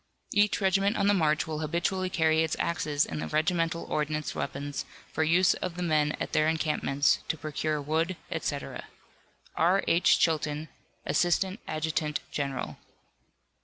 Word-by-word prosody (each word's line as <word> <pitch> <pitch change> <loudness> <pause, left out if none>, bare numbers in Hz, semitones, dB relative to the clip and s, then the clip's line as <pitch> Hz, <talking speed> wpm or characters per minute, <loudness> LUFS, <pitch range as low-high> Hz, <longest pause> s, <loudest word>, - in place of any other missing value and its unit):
Each 205 0 +3
regiment 195 +2 +2
on 200 - +1
the 205 - +5
march 155 -5 +2
will 155 -1 -4
habitually 175 +4 -1
carry 160 -2 +2
its 160 -1 0
axes 150 -3 0
in 80 - -5
the 80 - -3
regimental 165 - 0
ordnance 150 0 -2
wagons, 140 +1 -4 0.3
for 160 - 0
use 175 +4 +4
of 180 -2 -4
the 180 - -3
men 150 -3 +2
at - - -4
their 155 - +3
encampments, 155 -3 +1
to 160 - -1
procure 155 0 -2
wood, 160 +5 -1
etc. 155 -4 -4 0.7
R. 180 +4 +3
H. 170 +2 +4
CHILTON, 155 -1 0 0.4
Assistant 185 +4 +1
Adjutant 155 -1 -1
General. 140 -2 -3
160 Hz, 145 wpm, -28 LUFS, 150-175 Hz, 0.7 s, the